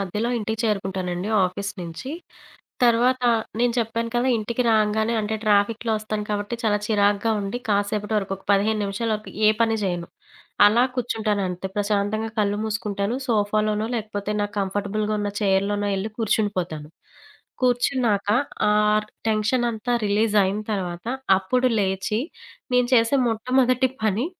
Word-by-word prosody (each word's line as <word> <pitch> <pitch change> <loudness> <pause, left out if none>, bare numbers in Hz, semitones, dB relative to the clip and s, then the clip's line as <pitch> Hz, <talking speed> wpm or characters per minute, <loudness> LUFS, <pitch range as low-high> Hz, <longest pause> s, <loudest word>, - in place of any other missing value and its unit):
మధ్యలో 210 +5 -2
ఇంటికి 220 0 -3
చేరుకుంటానండి 190 -3 -2 0.2
ఆఫీస్ 195 +2 -3
నుంచి. 170 +10 -7 0.7
తర్వాత, 245 +2 +3 0.4
నేను 240 0 +2
చెప్పాను 230 0 -1
కదా! 245 +2 +2
ఇంటికి 235 +3 -1
రాంగానే 220 +1 +2
అంటే, 215 +1 -2
ట్రాఫిక్‌లో 215 +2 +2
ఒస్తాను, 215 -1 -4
కాబట్టి 205 +3 -2
చాలా 210 -2 +2
చిరాకుగా 205 +1 +2
ఉండి, 200 +4 -3
కాసేపటి 205 +1 0
వరకు 195 -2 -1
ఒక 195 - -21
15 210 +2 +2
నిమిషాల 210 +3 -2
వరకు 215 0 -7 0.2
ఏ - - +8
పని 225 -1 +3
జేయను. 175 -3 -2 0.6
అలా 230 +4 +4
కూర్చుంటానంతే. 210 -7 -1
ప్రశాంతంగా 210 +2 0
కళ్ళు 205 -1 +1
మూసుకుంటాను. 210 0 -2
సోఫాలోనో, 215 0 +1
లేకపోతే 210 -2 -4
నాకు 205 0 -3
కంఫర్టబుల్‌గా 205 +2 -1
ఉన్న 205 0 -1
చైర్‌లోనో 205 +1 +1
ఎళ్ళి 205 +3 -3
కూర్చుండిపోతాను. 185 -8 -1 0.7
కూర్చున్నాక, 245 -4 +1 0.4
ఆ - - +4 0.6
టెన్షన్ 220 +3 +1
అంతా 225 +3 -3
రిలీజ్ 210 +1 +1
అయిన 195 +3 -1
తర్వాత, 180 -1 -4 0.3
అప్పుడు 250 +7 0
లేచి, 190 +3 -1 0.5
నేను 250 -1 +4
చేసే 230 +4 +3
మొట్టమొదటి 255 +3 +2 0.2
పని 215 +6 +1
210 Hz, 130 wpm, -23 LUFS, 200-225 Hz, 0.7 s, ఏ